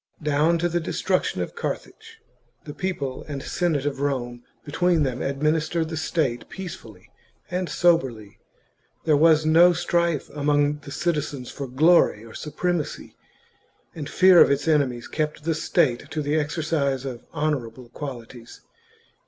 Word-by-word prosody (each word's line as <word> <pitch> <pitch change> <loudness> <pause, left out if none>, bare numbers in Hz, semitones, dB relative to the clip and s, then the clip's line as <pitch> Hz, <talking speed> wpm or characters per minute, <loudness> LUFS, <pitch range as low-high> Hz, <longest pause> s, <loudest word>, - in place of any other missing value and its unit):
Down 150 +3 +2
to 175 +1 0
the 175 0 -1
destruction 175 - -1
of - - -8
Carthage, - - -6 0.4
the 145 - -8
people 145 -9 -4
and 140 -2 -5
Senate 160 -6 -1
of 140 -2 -2
Rome 120 -4 -2 0.2
between 170 +1 +1
them 130 -3 -2
admin 140 +3 0
istered 160 +1 -1
the 165 - -4
state 150 -6 -1
peacefully 120 - -9 0.4
and 180 -1 -2
soberly; 135 -13 +1 0.6
there 155 -2 +3
was 155 +1 +4
no 170 +3 +6
strife 170 -2 0
among 145 0 +1
the 140 - -11
citizens 150 -4 -2
for 140 - -6
glory 135 -4 +3
or 115 - -12
supremacy, 170 +1 -3 0.8
and 150 -3 -6
fear 185 -1 +6
of - - +7
its 140 +2 0
enemies 135 -6 +1
kept 150 -1 -3
the 165 +1 0
state 150 -4 0
to 155 -1 -3
the^xercise 150 -2 -1
of 125 -3 -6
honourable 130 -6 -3
qualities. 120 -3 -9
150 Hz, 140 wpm, -24 LUFS, 135-165 Hz, 0.8 s, of